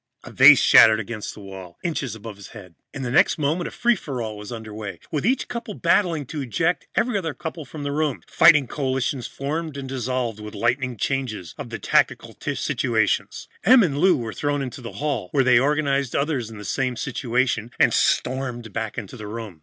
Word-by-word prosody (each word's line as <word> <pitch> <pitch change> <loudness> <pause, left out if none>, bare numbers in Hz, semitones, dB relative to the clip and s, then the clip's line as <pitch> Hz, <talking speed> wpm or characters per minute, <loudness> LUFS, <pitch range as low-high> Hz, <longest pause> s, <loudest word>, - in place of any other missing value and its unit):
A - - -10
vase - - +8
shattered 110 -1 +7
against 110 0 -6
the 105 - -11
wall, 95 -3 -10
inches 140 -9 -2
above 110 -1 -9
his 100 - -11
head. 90 -4 -12 0.2
In 135 -2 -6
the 120 - -3
next - - +4
moment, 155 +4 0
a - - -4
free 240 0 +2
for 140 - -6
all 110 -2 -4
was 105 +1 -9
under 110 -2 -7
way, 105 -1 -7
with 155 +4 -1
each 260 +2 +1
couple 235 -4 -6
battling 165 -7 +1
to 150 +3 -5
eject 160 - -1
every 230 -3 +1
other 160 -5 -4
couple 160 -2 -6
from 145 +3 -8
the 145 - -2
room. 150 -2 -1
Fighting 155 -4 +5
coalitions 130 -1 -2
formed 150 +2 -4
and 135 -1 -6
dissolved 125 -3 -2
with 105 0 -8
the - - -8
lightning 125 +1 0
changes 110 - -3
of - - -8
the - - -5
tactical - - +1
situation. - - 0 0.4
Em 245 +4 +7
and 150 -7 0
Lou 180 0 +4
were 115 -3 -5
thrown 145 -1 -1
into 130 0 -7
the 115 - -8
hall, 140 -11 -3
where 135 - +4
they 125 -2 +5
organized 140 -2 0
others 140 -6 -1
in 110 - -10
the 105 - -9
same 130 +5 -1
situation, 120 -3 -1
and - - +4
stormed 125 -4 0
back 110 +1 -4
into 110 0 -6
the 105 -3 -8
room. 105 -6 -7
130 Hz, 210 wpm, -23 LUFS, 110-150 Hz, 0.4 s, vase